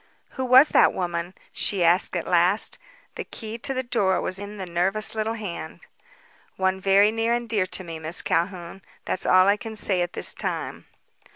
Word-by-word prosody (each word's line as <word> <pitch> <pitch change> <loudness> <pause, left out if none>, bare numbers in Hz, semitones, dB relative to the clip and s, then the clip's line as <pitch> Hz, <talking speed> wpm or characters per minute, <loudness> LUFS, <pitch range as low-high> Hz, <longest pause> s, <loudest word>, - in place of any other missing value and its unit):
"Who 260 - -4
was 260 +4 +6
that - - +4
woman?" 175 0 -4 0.2
she 195 -4 0
asked 175 +2 +2
at 170 - -2
last. 180 +4 +3 0.3
The - - -6
key 225 0 -7
to 270 - -2
the 260 -1 -2
door 205 -6 0
was 185 - -3
in 205 +1 -8
the 190 - -5
nervous 185 +5 +1
little 220 +1 -2
hand. 205 -6 -7 0.8
"One 190 0 0
very 200 +2 +4
near 225 +1 0
and 240 0 -2
dear 205 -5 0
to 185 - -2
me. 165 -2 -8
Miss 160 +2 -2
Calhoun. 175 +2 -2 0.2
That's 185 - -3
all 185 +1 +5
I 200 +1 +3
can 220 +1 -8
say 195 -3 0
at 175 0 -3
this - - +1
time." - - -5
195 Hz, 190 wpm, -24 LUFS, 180-220 Hz, 0.8 s, was